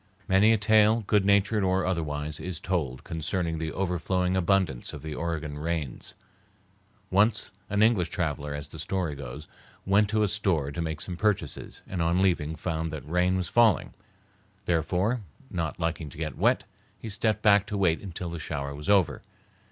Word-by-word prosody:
Many 95 +4 +5
a 115 - +4
tale, 110 +1 +4
good 105 -1 +3
natured 100 +2 +3
or 95 0 +2
otherwise, 75 -4 -2
is 90 -3 -5
told 75 -9 -2
concerning 80 +1 -2
the 80 0 -3
overflowing 90 0 0
abundance 95 -8 +1
of 75 - -8
the 80 -1 -5
Oregon 80 -3 -3
rains. 80 -5 -3 1.0
Once 105 +3 +3 0.2
an 105 +1 +3
English 110 -6 +3
traveler, 75 -6 -2
as 75 0 -5
the 80 +2 -11
story 90 -1 -1
goes, 70 +1 -8 0.4
went 100 +2 +3
to 110 0 +2
a - - +3
store 90 -9 0
to 85 - -4
make 80 -2 -3
some 85 +3 -4
purchases 105 -1 -1
and 90 -3 -3
on 85 +2 +2
leaving 85 -5 +1
found 80 0 -3
that 75 -1 -7
rain 90 +3 +2
was 90 -2 -1
falling; 115 -4 +3 0.7
therefore, 90 +8 +1 0.3
not 85 -2 -3
liking 80 -2 -2
to 70 - -13
get 80 -1 -3
wet, - - +2 0.3
he - - -8
stepped 110 +1 0
back 100 -1 +5
to 105 - -3
wait 90 -1 0
till 90 -2 -4
the 85 - -5
shower 70 -2 -4
was 75 +5 -6
over. 100 -4 +3
90 Hz, 175 wpm, -27 LUFS, 80-100 Hz, 1.0 s, Many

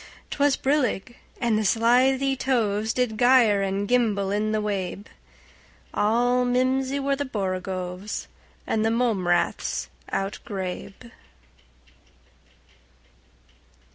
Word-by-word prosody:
'T - - -5
was 285 -1 +3
brillig, 255 -5 0 0.2
and 230 -3 +1
the - - 0
slithy 255 +5 +3
tovesDid 225 -2 0
gyre 245 -5 +5
and 195 +1 -1
gimble 210 -5 +1
in 210 +1 0
the 215 - +1
wabe; 200 -1 -3 0.9
All 245 +4 +2
mimsy 260 +2 +1
were 275 0 0
the 285 - -2
borogoves, 185 -4 -4 0.4
And 220 - 0
the 225 - +2
mome 225 -6 0
raths 175 0 0 0.2
outgrabe. 195 +3 -5
225 Hz, 100 wpm, -25 LUFS, 200-250 Hz, 0.9 s, gyre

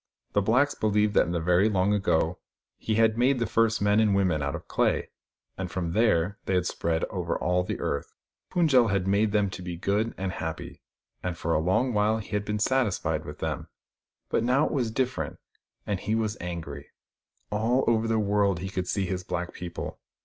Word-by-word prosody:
The 100 - +3
blacks 125 +8 +3
believed 105 -1 +1
that - - +4
in - - -2
the 85 - 0
very 90 +5 +3
long 100 0 +2
ago 90 -3 +1 0.4
he 110 - -1
had 110 0 +3
made 130 +2 +4
the 120 - 0
first 115 -1 +2
men 105 +1 +4
and 105 -3 +3
women 95 -6 +2
out 70 0 -2
of - - -9
clay; - - 0 0.5
and 95 -1 -3
from 85 -3 -3
there 100 -2 +2
they 95 - 0
had 90 -1 +1
spread 80 -2 -1
over - - -2
all 90 +1 +1
the 90 - -4
earth. 70 - -2 0.4
Fund 170 -3 +2
j 130 - +6
el 120 - +4
had 100 -3 0
made 100 +2 +2
them 105 -2 +1
to 90 - -7
be 90 -1 -5
good 105 +6 0
and 95 0 -2
happy, 80 -3 -6 0.4
and 90 -2 -3
for 85 +1 -1
a - - +3
long 95 +10 +1
while 105 +1 +2
he 110 - -8
had 105 -1 -1
been 105 0 -1
satisfied 105 -10 0
with 75 - -8
them. 80 -3 -3 0.6
But - - +1
now 130 +5 +3
it - - -2
was 125 -6 0
different, 130 +3 -2 0.5
and 100 -3 -1
he 110 - -1
was 110 -2 0
angry. 80 -5 -6 0.6
All 115 +5 +2
over 115 -1 +2
the 115 0 +1
world 100 -2 +2
he 95 +3 -5
could 90 -1 -3
see 100 -2 0
his 90 0 -3
black 90 0 -4
people. 85 -1 -6
100 Hz, 210 wpm, -27 LUFS, 90-110 Hz, 0.6 s, j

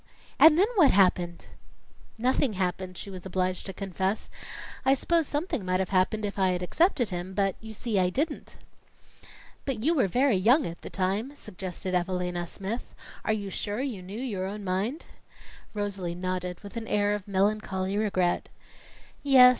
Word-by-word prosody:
"And 315 -1 +9
then 380 - +6
what 310 -7 +7
happened?" 180 -3 +3 0.7
"Nothing 250 +1 +2
happened," 185 -1 -2
she 200 - -6
was 185 -2 -8
obliged 185 0 -1
to - - -3
confess. 190 +2 -2 0.5
"I 270 - +5
s'pose 330 +2 +2
something 290 - -1
might 185 0 +1
have 190 - -1
happened 200 +3 +2
if 200 0 -4
I'd 180 -1 +2
accepted 270 - +2
him, 180 0 -5
but 195 -2 +2
you 220 0 -9
see, 215 -2 0
I 180 -1 +3
didn't." 290 - -2 1.1
"But 250 -6 -3
you 320 +5 +4
were 265 -11 +3
very 250 +3 +3
young 245 +11 +4
at 170 0 -6
the - - -7
time," 200 +9 -1
suggested 185 -5 -6
Evalina 180 -1 -1
Smith. 200 +7 -5 0.3
"Are - - +1
you 205 -2 -2
sure 205 +3 -2
you 250 -9 -3
knew 195 +5 -7
your 205 -8 -2
own 205 +1 -5
mind?" 195 - -1 0.7
Rosalie 195 -4 -2
nodded 180 0 -3
with 200 +3 -8
an 225 -1 -5
air 205 0 +2
of 210 -2 -4
melancholy 195 -1 0
regret. 190 -4 +1 0.7
"Yes. 265 -3 +8
195 Hz, 165 wpm, -28 LUFS, 185-230 Hz, 1.1 s, And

